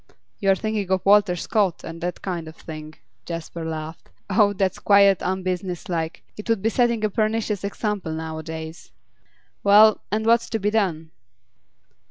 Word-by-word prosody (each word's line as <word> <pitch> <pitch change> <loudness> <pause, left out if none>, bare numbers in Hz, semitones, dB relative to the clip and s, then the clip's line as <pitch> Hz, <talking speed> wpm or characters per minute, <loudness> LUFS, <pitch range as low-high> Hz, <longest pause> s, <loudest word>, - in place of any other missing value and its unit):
'You 195 - +1
are 195 - +6
thinking 215 -1 -2
of 190 -1 0
Walter 200 -2 +5
Scott, 190 0 0
and 165 0 -8
that 175 +1 -4
kind 175 -4 -4
of 160 - -10
thing' 155 -1 -9 0.3
Jasper 165 0 -6
laughed. 160 0 -6 0.2
'Oh, 205 0 +4
that's 190 -2 -1
quite 200 -2 +5
unbusinesslike; 180 -3 -3
it 210 +2 -9
would 225 -4 +1
be 225 - +3
setting 235 -2 +1
a - - +1
pernicious 215 -1 -1
example 200 -3 -3
nowadays. 160 0 -6 0.7
Well, 210 +2 +6
and 220 +1 0
what's 235 +1 +3
to 225 - -1
be 205 +2 0
done? 170 -7 -1
190 Hz, 155 wpm, -23 LUFS, 165-210 Hz, 0.7 s, are